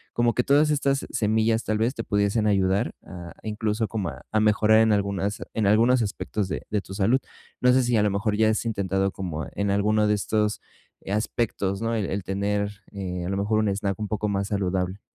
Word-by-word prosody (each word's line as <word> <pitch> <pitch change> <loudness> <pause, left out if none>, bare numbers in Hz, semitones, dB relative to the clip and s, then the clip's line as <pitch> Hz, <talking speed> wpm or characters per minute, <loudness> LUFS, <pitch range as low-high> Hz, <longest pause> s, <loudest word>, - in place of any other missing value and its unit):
Como 120 -1 +2
que 125 - +2
todas 145 +3 +4
estas 140 -2 0
semillas, 110 +1 +1
tal 110 0 -1
vez, 120 +4 +1
te 115 - -4
pudiesen 100 +1 +1
ayudar 95 -1 +1
a 85 -1 -9
incluso, 110 0 -1
como 105 -6 -3
a - - -10
a 110 - +2
mejorar 110 +1 +4
en 110 0 +4
algunas 100 0 -1
en 110 - +1
algunos 115 +4 +4
aspectos 105 -1 -3
de - - -4
de 105 -1 0
tu 95 - -10
salud. 105 +6 +2 0.4
No 125 0 +5
sé 130 - +4
si 120 -2 +2
a 105 - +3
lo 105 - +2
mejor 105 +1 0
ya 110 0 +4
has 110 - 0
intentado 95 -3 0
como 85 -5 -5
e - - -10
en 100 0 0
alguno 105 +2 +2
de 105 - +3
estos, 105 +1 -1 0.4
eh, 95 - -5
aspectos, 105 -2 -1
¿no?, 115 0 0
el 105 -3 -1
el 100 -1 -2
tener, 100 +1 -1 0.2
eh, 90 -3 -4
a - - -3
lo 95 - -1
mejor, 105 +2 +1
un 110 -1 +1
snack 100 +1 -2
un 105 - -3
poco 105 0 -2
más 100 0 -1
saludable. 95 -1 -1
105 Hz, 220 wpm, -25 LUFS, 100-110 Hz, 0.4 s, No